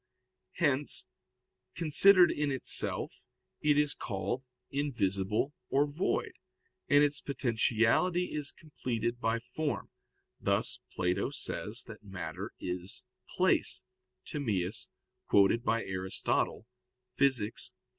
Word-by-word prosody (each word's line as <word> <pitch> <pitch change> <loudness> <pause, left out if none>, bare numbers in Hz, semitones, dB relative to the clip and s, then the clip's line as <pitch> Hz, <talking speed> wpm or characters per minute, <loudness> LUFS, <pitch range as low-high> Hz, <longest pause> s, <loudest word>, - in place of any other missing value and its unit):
Hence, - - +2 0.7
considered 175 +3 +6
in 145 -1 -1
itself, 130 - +1 0.3
it 150 -1 +3
is 150 -1 +2
called 105 +4 -3 0.3
"invisible" 115 -3 -1 0.2
or 140 +2 +3
"void," 150 +6 -1 0.6
and 145 0 +5
its 145 0 +2
potentiality 130 +7 +1
is 150 -2 -1
completed 120 -6 -4
by 115 +1 +1
form; 145 +6 -4 0.5
thus - - 0
Plato 90 0 0
says - - -1
that - - -11
matter 95 0 -6
is 90 +1 -4 0.3
"place" - - +2 0.4
[*Timaeus, 105 -8 -2 0.4
quoted 100 +4 +4
by 115 -2 +1
Aristotle, 95 +3 -1 0.5
Phys. 130 -6 +2
120 Hz, 95 wpm, -31 LUFS, 100-145 Hz, 0.7 s, considered